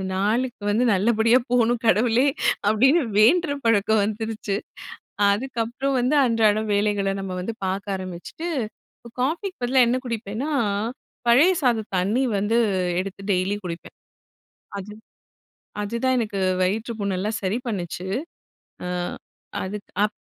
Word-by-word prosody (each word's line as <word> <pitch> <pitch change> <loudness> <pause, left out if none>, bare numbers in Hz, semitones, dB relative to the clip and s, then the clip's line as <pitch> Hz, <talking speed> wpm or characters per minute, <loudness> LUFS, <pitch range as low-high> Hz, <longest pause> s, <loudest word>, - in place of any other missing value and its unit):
நாளுக்கு 220 +3 0
வந்து 220 +4 +2
நல்லபடியா 225 +4 +4
போணும் 240 -1 +3
கடவுளே 230 +4 +4 0.4
அப்டின்னு 265 +10 +4 0.2
வேண்ற 295 +8 +5
பழக்கம் 220 -1 +3
வந்துருச்சு. 215 -1 -3 0.7
அ, - - +3
அதுக்கப்புறம் 245 +3 -2
வந்து 255 +5 +1
அன்றாட 220 -3 +3
வேலைகள 200 -1 +1
நம்ப 190 -1 -4
வந்து 225 +5 -3
பாக்க 195 +1 -2
ஆரம்பிச்சிட்டு 185 - -6 0.7
காபிக்கு 345 +8 -1
பதிலா 255 +2 +3
என்ன 245 +2 +2
குடிப்பேன்னா, 230 +5 -3 0.8
பழைய 295 +11 +6
சாத 235 -4 +2
தண்ணி 210 +9 +1
வந்து 220 +4 +1 0.4
எடுத்து 195 +1 -6
டெய்லி 185 +3 0
குடிப்பேன். 170 0 -7 0.8
அது 205 +2 -8 0.9
அதுதான் 235 +5 0
எனக்கு 210 -4 -2 0.2
வயிற்றுப்புண்லாம் 205 0 -1
சரி 195 +5 0
பண்ணுச்சு. 185 -2 -4 0.8
ஆ, - - -3 0.8
அதுக்கப் 205 +1 -2
220 Hz, 110 wpm, -23 LUFS, 200-245 Hz, 0.9 s, பழைய